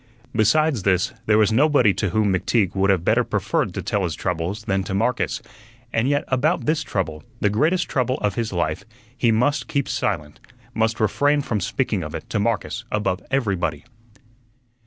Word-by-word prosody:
Besides 130 Hz, +4 st, +3 dB
this, 95 Hz, +3 st, +1 dB
there 105 Hz, -1 st, +4 dB
was 110 Hz, 0 st, +4 dB
nobody 130 Hz, -4 st, +4 dB
to 100 Hz, -, -1 dB
whom 105 Hz, +1 st, +1 dB
McTeague 95 Hz, +1 st, +1 dB
would 95 Hz, 0 st, +1 dB
have 90 Hz, -3 st, +2 dB
better -, -, +3 dB
preferred -, -, -1 dB
to -, -, -3 dB
tell 100 Hz, -, 0 dB
his 85 Hz, -4 st, -2 dB
troubles 90 Hz, +5 st, -3 dB
than 95 Hz, -2 st, 0 dB
to 95 Hz, -, -3 dB
Marcus, 115 Hz, +5 st, 0 dB, 0.5 s
and 115 Hz, +4 st, +1 dB
yet 145 Hz, 0 st, +1 dB
about 130 Hz, +4 st, +1 dB
this 155 Hz, +1 st, +1 dB
trouble, 85 Hz, -, -3 dB, 0.2 s
the 105 Hz, -, +2 dB
greatest 160 Hz, -, +1 dB
trouble 130 Hz, -2 st, 0 dB
of 105 Hz, -, -1 dB
his 115 Hz, -2 st, -2 dB
life, 85 Hz, -1 st, -1 dB, 0.3 s
he 120 Hz, -3 st, +2 dB
must 125 Hz, +7 st, +1 dB
keep 140 Hz, -2 st, -1 dB
silent; 75 Hz, -7 st, -2 dB, 0.3 s
must 110 Hz, 0 st, 0 dB
refrain 145 Hz, +7 st, +2 dB
from 110 Hz, -7 st, -2 dB
speaking 105 Hz, 0 st, -1 dB
of 75 Hz, -2 st, -6 dB
it 120 Hz, -, -7 dB
to 110 Hz, -, 0 dB
Marcus 110 Hz, +1 st, -1 dB
above 95 Hz, -3 st, -1 dB
everybody. 95 Hz, -, -1 dB
110 Hz, 180 wpm, -22 LUFS, 95-125 Hz, 0.5 s, there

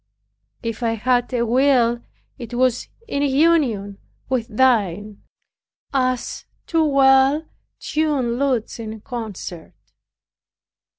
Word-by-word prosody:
If 230 Hz, 0 st, -4 dB
I 230 Hz, -1 st, +1 dB
had 245 Hz, +2 st, 0 dB
a 240 Hz, -2 st, 0 dB
will, 240 Hz, -1 st, +3 dB, 0.4 s
it 240 Hz, -1 st, -7 dB
was 250 Hz, -1 st, +1 dB, 0.2 s
in 280 Hz, -10 st, -2 dB
union 270 Hz, -9 st, +2 dB, 0.3 s
with 250 Hz, -3 st, -1 dB
thine, 210 Hz, -4 st, +1 dB, 0.7 s
as 255 Hz, -2 st, -1 dB, 0.2 s
two 325 Hz, -1 st, +1 dB
well 275 Hz, +1 st, +4 dB, 0.3 s
tuned 280 Hz, -6 st, -1 dB
lutes 255 Hz, -5 st, -1 dB
in 220 Hz, -1 st, -7 dB
concert. 215 Hz, -8 st, -7 dB
245 Hz, 100 wpm, -21 LUFS, 225-270 Hz, 0.7 s, well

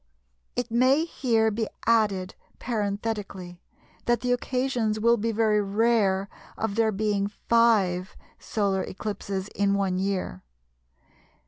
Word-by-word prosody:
It 245 Hz, -1 st, -2 dB
may 260 Hz, +6 st, +4 dB
here 225 Hz, -8 st, +1 dB
be 220 Hz, +1 st, -2 dB, 0.2 s
added, 205 Hz, -5 st, +2 dB, 0.2 s
parenthetically, 205 Hz, -5 st, -4 dB, 0.4 s
that 240 Hz, 0 st, +2 dB
the 250 Hz, -, 0 dB
occasions 245 Hz, -3 st, 0 dB
will 235 Hz, +2 st, +4 dB
be 230 Hz, 0 st, -1 dB
very 215 Hz, -1 st, +2 dB
rare 200 Hz, -2 st, +2 dB, 0.3 s
of 220 Hz, -2 st, -2 dB
there 220 Hz, +1 st, +2 dB
being 205 Hz, -1 st, 0 dB
5 205 Hz, -5 st, +2 dB, 0.2 s
solar 200 Hz, -3 st, -1 dB
eclipses 195 Hz, -1 st, -4 dB
in 200 Hz, 0 st, +1 dB
one 190 Hz, -2 st, 0 dB
year. 190 Hz, -, -2 dB
215 Hz, 115 wpm, -26 LUFS, 195-230 Hz, 0.4 s, may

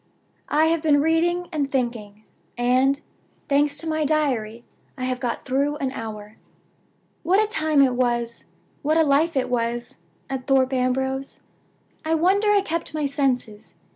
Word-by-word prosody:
I 310 Hz, +2 st, +3 dB
have 325 Hz, 0 st, +1 dB
been 300 Hz, -3 st, +3 dB
reading 340 Hz, +3 st, +1 dB
and 290 Hz, -4 st, -1 dB
thinking; 225 Hz, -5 st, -3 dB, 0.3 s
and, 255 Hz, +3 st, +2 dB, 0.5 s
thanks 285 Hz, 0 st, +2 dB
to 325 Hz, -, -2 dB
my 315 Hz, -1 st, 0 dB
Diary, 255 Hz, -7 st, 0 dB, 0.3 s
I 255 Hz, -, -5 dB
have 255 Hz, 0 st, -2 dB
got 245 Hz, -2 st, -3 dB
through 280 Hz, +3 st, 0 dB
an 275 Hz, -3 st, -2 dB
hour. 215 Hz, -3 st, -8 dB, 0.8 s
"What 365 Hz, +5 st, +3 dB
a 435 Hz, -, +4 dB
time 310 Hz, -8 st, +2 dB
it 260 Hz, -2 st, +2 dB
was 240 Hz, -2 st, -1 dB, 0.4 s
what 310 Hz, +2 st, +1 dB
a 325 Hz, -, +5 dB
life 300 Hz, +2 st, +2 dB
it 260 Hz, -, +1 dB
was, 235 Hz, -4 st, -3 dB, 0.3 s
at 265 Hz, -1 st, -5 dB
Thorpe 265 Hz, -1 st, +3 dB
Ambrose! 265 Hz, +1 st, -1 dB, 0.6 s
I 320 Hz, +1 st, +1 dB
wonder 385 Hz, +6 st, +2 dB
I 410 Hz, -1 st, +4 dB
kept 335 Hz, -4 st, -4 dB
my 305 Hz, -1 st, -1 dB
senses. 255 Hz, -6 st, -2 dB
275 Hz, 155 wpm, -23 LUFS, 245-310 Hz, 0.8 s, a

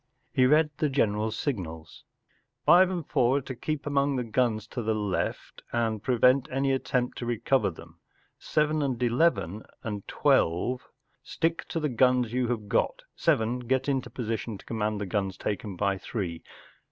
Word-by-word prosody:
He 130 Hz, -1 st, +4 dB
read 150 Hz, +2 st, +4 dB
the 150 Hz, -, +1 dB
general 110 Hz, -5 st, +1 dB
s 110 Hz, -, -4 dB
signals. 80 Hz, -, -5 dB, 0.3 s
“ -, -, -44 dB
Five 180 Hz, +1 st, +7 dB
and 175 Hz, -4 st, -3 dB
Four 130 Hz, -2 st, +3 dB
are -, -, -1 dB
to 130 Hz, -, -6 dB
keep 155 Hz, +4 st, -4 dB
among 140 Hz, -1 st, +1 dB
the 125 Hz, -, -1 dB
guns 115 Hz, -2 st, 0 dB
to 125 Hz, -, -4 dB
the 110 Hz, -1 st, 0 dB
left 105 Hz, -3 st, -3 dB
and 110 Hz, -3 st, 0 dB
prevent 125 Hz, +2 st, +3 dB
any 135 Hz, +1 st, 0 dB
attempt 125 Hz, -2 st, -1 dB
to 120 Hz, -, -4 dB
recover 120 Hz, 0 st, +1 dB
them. 85 Hz, -, -13 dB, 0.4 s
Seven 150 Hz, 0 st, +1 dB
and 130 Hz, -4 st, -1 dB
Eleven 115 Hz, -, +2 dB, 0.2 s
and 105 Hz, -2 st, -4 dB
Twelve, 105 Hz, +10 st, +1 dB, 0.3 s
stick 165 Hz, 0 st, -2 dB
to 165 Hz, -, -2 dB
the 155 Hz, -, 0 dB
guns 125 Hz, -1 st, +2 dB
you 125 Hz, -1 st, +1 dB
have 115 Hz, -4 st, -2 dB
got; -, -, 0 dB
Seven, 125 Hz, -6 st, +1 dB
get 130 Hz, +2 st, 0 dB
into 135 Hz, -2 st, 0 dB
position 115 Hz, -2 st, -4 dB
to -, -, -17 dB
command 110 Hz, -2 st, -2 dB
the 105 Hz, -, -2 dB
guns 95 Hz, 0 st, -2 dB
taken 105 Hz, -1 st, -3 dB
by 100 Hz, 0 st, 0 dB
Three. 90 Hz, -8 st, -4 dB
120 Hz, 175 wpm, -28 LUFS, 105-135 Hz, 0.4 s, Five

